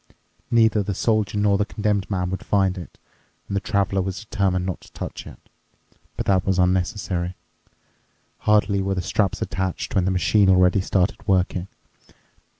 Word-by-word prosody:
Neither 110 -2 +4
the 100 -1 -3
Soldier 105 -1 0
nor 100 -1 +2
the 105 - +2
Condemned 105 -2 -1
Man 90 -2 -1
would 95 - -4
find 95 -2 +1
it, 90 -4 -10 0.5
and 100 - -4
the 100 - 0
Traveler 100 -3 0
was 95 +2 -4
determined 95 -3 0
not 90 -2 -4
to - - -17
touch - - -7
it. - - -11 0.8
But - - -2
that 95 -2 +2
was 95 -1 0
unnecessary. 90 -1 0 1.0
Hardly 105 -2 +2
were 95 0 -1
the 90 - -2
straps 95 +4 0
attached 95 -2 -3
when 95 -2 +2
the - - +1
machine 95 +2 +3
already 90 +1 +4
started 95 +2 -1
working. 95 -1 +1
95 Hz, 160 wpm, -23 LUFS, 90-100 Hz, 1.0 s, Neither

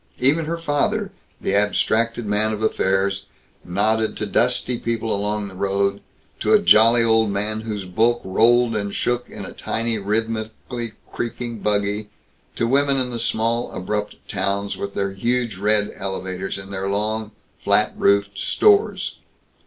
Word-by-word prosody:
Even 150 +5 +3
her 165 +2 -2
father, 180 +7 0 0.3
the - - -1
abstracted 110 +3 +1
man 105 +1 +1
of 110 +1 -4
affairs, 100 -1 +1 0.4
nodded 110 +4 0
to 105 - -2
dusty 120 +2 +1
people 115 -2 -1
along 105 +1 -2
the 95 - -10
road; 100 +1 0 0.4
to - - +2
a - - +6
jolly 110 +5 +6
old 110 -1 +3
man 105 +2 -2
whose 105 -3 -4
bulk 115 +6 +2
rolled 115 +4 +3
and 100 -1 -2
shook 120 0 -1
in - - -8
a - - -9
tiny, 115 -1 -2
rhythmically 110 +2 -3 0.2
creaking 120 -1 -4
buggy, 105 0 -1 0.5
to - - 0
women 140 +3 +2
in 125 -1 -1
the 120 - -4
small 115 +1 0
abrupt 105 +3 -3
towns 100 0 -1
with 100 0 -5
their 100 -1 -1
huge 115 +1 -1
red 105 +1 +1
elevators 95 -1 -4
and 95 +1 -8
their 95 0 -2
long, 105 +2 -1 0.3
flat - - +3
roofed 100 0 +2
stores. 420 -1 +2
110 Hz, 150 wpm, -22 LUFS, 100-115 Hz, 0.5 s, a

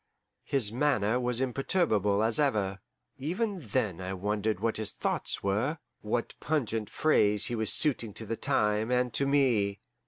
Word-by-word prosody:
His 125 -7 +1
manner 120 -3 +1
was 125 0 0
imperturbable 120 - +1
as 115 +3 +2
ever. 105 -9 0 0.4
Even 190 - -2
then 105 - -2
I 95 +1 -4
wondered 105 +1 -2
what 115 +1 -1
his 110 -2 -1
thoughts - - -2
were, 110 +11 0 0.2
what 115 +2 -2
pungent 115 -8 -2
phrase 105 -10 +3
he 120 - -1
was 110 -2 +3
suiting 125 -8 +3
to 110 - -7
the 115 - -3
time 105 +1 0
and 125 -1 +1
to 140 - +1
me. 120 -8 +2
115 Hz, 155 wpm, -29 LUFS, 105-135 Hz, 0.4 s, phrase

